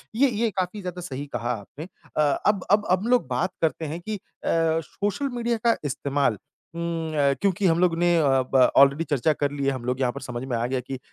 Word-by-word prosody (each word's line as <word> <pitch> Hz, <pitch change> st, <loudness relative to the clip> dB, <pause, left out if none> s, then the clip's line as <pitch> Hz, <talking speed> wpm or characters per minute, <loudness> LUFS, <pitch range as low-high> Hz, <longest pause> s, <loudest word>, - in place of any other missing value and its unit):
ये 270 Hz, +3 st, +4 dB
ये 230 Hz, 0 st, 0 dB
काफ़ी 185 Hz, +3 st, -2 dB
ज़्यादा 180 Hz, -1 st, -6 dB
सही 145 Hz, -4 st, -5 dB
कहा 120 Hz, +1 st, -1 dB
आपने। 150 Hz, -, -10 dB, 0.3 s
अ, -, -, +4 dB, 0.2 s
अब 205 Hz, -3 st, +2 dB
अब 210 Hz, 0 st, +4 dB
अब 190 Hz, +5 st, +2 dB
लोग 250 Hz, 0 st, +3 dB
बात 185 Hz, -, -1 dB
करते 160 Hz, 0 st, 0 dB
हैं 160 Hz, +3 st, -4 dB
कि 215 Hz, +4 st, -4 dB
अ, 200 Hz, -, -8 dB, 0.6 s
सोशल 205 Hz, -, -3 dB
मीडिया 235 Hz, -1 st, 0 dB
का 230 Hz, -, +5 dB
इस्तेमाल 140 Hz, -4 st, 0 dB, 0.4 s
हुँ, 165 Hz, -2 st, -3 dB
अ, 140 Hz, -2 st, +3 dB
क्योंकि 200 Hz, 0 st, +1 dB
हम 165 Hz, 0 st, +3 dB
लोग 180 Hz, -2 st, +3 dB
ने 175 Hz, 0 st, +3 dB
अ, -, -, +4 dB, 0.3 s
ब 130 Hz, -1 st, +6 dB
ऑलरेडी 140 Hz, +3 st, +6 dB
चर्चा 150 Hz, +2 st, +2 dB
कर 145 Hz, -1 st, -1 dB
ली 140 Hz, -1 st, -3 dB
है, 140 Hz, -, +3 dB
हम 125 Hz, -2 st, -5 dB
लोग 125 Hz, +1 st, -1 dB
यहाँ 125 Hz, -2 st, +1 dB
पर 140 Hz, -, -8 dB
समझ 125 Hz, 0 st, -5 dB
में 125 Hz, -, -1 dB
आ 115 Hz, -, -1 dB
गया 130 Hz, 0 st, -1 dB
कि 130 Hz, +2 st, -6 dB
अ, -, -, -9 dB
160 Hz, 235 wpm, -25 LUFS, 135-195 Hz, 0.6 s, ब